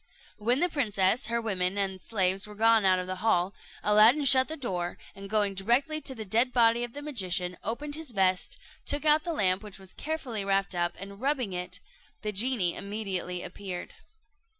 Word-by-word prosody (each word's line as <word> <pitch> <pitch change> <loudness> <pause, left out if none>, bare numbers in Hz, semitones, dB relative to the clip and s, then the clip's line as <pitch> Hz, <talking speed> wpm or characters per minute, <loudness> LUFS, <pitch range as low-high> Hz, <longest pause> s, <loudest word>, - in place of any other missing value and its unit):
When 240 +5 +2
the 355 - +4
princess, 220 - +1
her 235 0 0
women, 195 -4 -1
and 190 -2 -2
slaves 195 -2 0
were 210 - -11
gone 225 -1 +4
out 185 -1 +5
of 180 - -3
the 185 0 -4
hall, 185 -2 +1 0.3
Aladdin 220 +8 +5
shut 260 0 +7
the 315 - -5
door, 180 -9 -3 0.2
and 195 0 -10
going 205 -2 +1
directly 245 +11 +1
to 265 - -3
the 220 -2 -6
dead 230 +6 +2
body 235 -1 +3
of 240 -1 -5
the 290 - -7
magician, 185 -10 -1
opened 290 +7 -4
his 315 -1 -4
vest, 190 -4 +1 0.3
took 290 +2 -1
out 305 +1 +4
the 345 - -2
lamp 190 - +1
which 210 -2 -10
was 190 -1 -11
carefully 280 -9 -4
wrapped 195 0 0
up, 175 0 -1
and 200 +2 -10
rubbing 260 -7 0
it, 180 0 -4 0.4
the 210 - -2
genie 210 -4 +2
immediately 195 -3 -4
appeared. 185 -3 -7
210 Hz, 190 wpm, -28 LUFS, 190-250 Hz, 0.4 s, shut